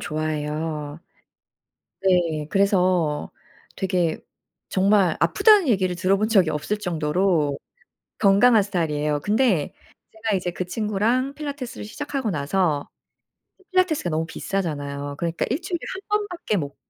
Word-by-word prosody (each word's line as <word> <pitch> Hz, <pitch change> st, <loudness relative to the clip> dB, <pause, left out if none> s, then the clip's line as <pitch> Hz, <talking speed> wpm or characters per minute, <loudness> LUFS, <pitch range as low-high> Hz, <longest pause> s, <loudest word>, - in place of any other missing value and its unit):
좋아해요. 155 Hz, 0 st, -3 dB, 1.0 s
네. 170 Hz, -5 st, +2 dB
그래서 185 Hz, -6 st, +1 dB, 0.5 s
되게 180 Hz, -4 st, 0 dB, 0.5 s
정말 190 Hz, -3 st, +3 dB
"아프다."는 420 Hz, -9 st, +5 dB
얘기를 185 Hz, -5 st, +2 dB
들어본 195 Hz, +4 st, +1 dB
적이 190 Hz, -7 st, +4 dB
없을 155 Hz, +8 st, -2 dB
정도로 165 Hz, -4 st, 0 dB, 0.6 s
건강한 210 Hz, +2 st, +5 dB
스타일이에요. 150 Hz, -6 st, -1 dB
근데 205 Hz, -, +1 dB, 0.4 s
제가 220 Hz, -2 st, -1 dB
이제 180 Hz, -1 st, -2 dB
그 180 Hz, -, -3 dB
친구랑 220 Hz, +7 st, 0 dB
필라테스를 285 Hz, -7 st, -6 dB
시작하고 270 Hz, 0 st, -3 dB
나서 150 Hz, 0 st, 0 dB, 0.7 s
그 380 Hz, -, -25 dB
필라테스가 360 Hz, -, +1 dB
너무 160 Hz, +1 st, -1 dB
비싸잖아요. 145 Hz, -6 st, -4 dB
그러니까 170 Hz, 0 st, -1 dB
1 280 Hz, +9 st, -1 dB
주일에 350 Hz, -2 st, -3 dB
1 380 Hz, -, -7 dB, 0.2 s
번밖에 355 Hz, -, -3 dB
못 145 Hz, -5 st, -4 dB
185 Hz, 295 characters per minute, -23 LUFS, 155-220 Hz, 1.0 s, 아프다."는